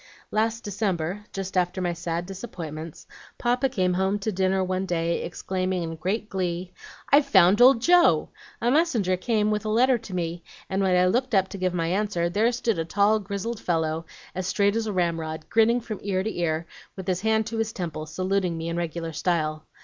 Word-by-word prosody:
"Last 225 +1 0
December, 195 -1 -2
just 195 -1 -5
after 180 +1 +1
my 175 -1 0
sad 170 0 -3
disappointments, 165 -6 -7 0.3
Papa 250 +2 +1
came 185 -8 +1
home 190 +2 +1
to 205 +2 -2
dinner 190 0 +1
one 185 +1 -2
day, 170 -1 0
exclaiming, 185 0 -2
in 165 0 -4
great 195 +7 -2
glee: 180 -2 -3 0.4
'I've 285 0 +6
found 190 -3 +5
old 245 -2 +7
Joe! 350 +2 +5 0.3
A 240 - +1
messenger 250 - +2
came 215 +2 +1
with 210 0 -1
a 215 - -3
letter 245 +3 +3
to 205 -4 -8
me, 170 -1 -3 0.3
and 190 +1 +1
when 185 -2 +3
I 180 - +4
looked 245 +5 +1
up 190 -1 +3
to 200 - -7
give 185 -1 0
my 165 -1 0
answer, 180 -1 0
there 220 +5 +2
stood 230 -5 -1
a - - +1
tall, 205 +5 +3
grizzled 200 +3 -4
fellow, 160 -1 -1 0.3
as 185 0 -3
straight 200 +1 +2
as 225 -1 -1
a - - -1
ramrod, 165 -4 -2
grinning 230 +2 +4
from 215 -3 -6
ear 190 -2 -1
to 220 - -3
ear, 165 -1 -1 0.3
with 190 - -7
his 185 -1 0
hand 220 0 +2
to 225 - -4
his 225 -1 0
temple, 160 -6 -5
saluting 185 0 -1
me 165 +1 -4
in 170 - -3
regular 165 -1 -3
style. 155 -2 -1
190 Hz, 200 wpm, -25 LUFS, 170-215 Hz, 0.4 s, old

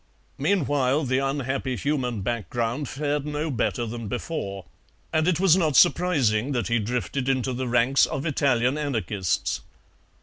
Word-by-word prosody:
"Meanwhile, 145 -6 +1
the 130 0 +1
unhappy 135 -1 -2
human 125 -6 -1
background 120 - -2
fared 145 +1 -1
no 150 +1 -3
better 120 -1 -1
than 115 0 -6
before, 100 - -4 0.5
and 155 +1 +2
it 180 -3 +2
was 185 -3 +5
not 160 -6 +1
surprising 140 -8 +3
that 120 -2 -1
he 120 0 +2
drifted 125 +4 -2
into 130 -1 0
the 130 +1 -3
ranks 120 +3 +3
of 135 +3 -4
Italian 135 -2 +1
anarchists. 105 - -1
130 Hz, 140 wpm, -25 LUFS, 120-145 Hz, 0.5 s, was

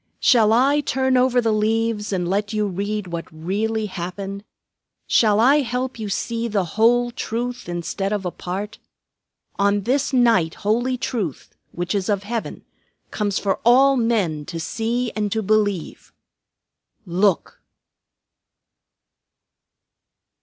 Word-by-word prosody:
Shall 225 -5 +4
I 270 +6 +4
turn 260 -1 0
over 250 0 +3
the 230 -2 +1
leaves 220 0 0
and 180 -3 -1
let 205 +3 -1
you 210 -1 +1
read 205 +2 -3
what 170 -2 -6
really 210 +7 -2
happened? 195 +1 -6 0.6
Shall 215 -2 +3
I 265 +6 +5
help 250 -2 -2
you 215 -2 -4
to - - 0
see 235 0 -2
the 205 -4 0
whole 240 +7 +2
truth 240 -1 -4
instead 175 +3 -3
of 205 -2 -2
a 180 - -1
part? 195 +5 -6 0.8
On 200 0 +2
this 265 +7 0
night 230 -11 +3
holy 240 +4 +1
Truth, 215 - -4 0.2
which 175 +2 -3
is 200 0 -1
of 200 -1 0
Heaven, 225 +2 -5 0.5
comes 205 -2 -1
for 195 -2 -1
all 265 +4 +5
men 210 - 0
to 165 +1 -6
see 230 +6 -2
and 210 -2 -1
to 220 +1 -1
believe. 205 -4 -1 0.9
Look!" 185 +1 0
215 Hz, 130 wpm, -22 LUFS, 195-240 Hz, 0.9 s, I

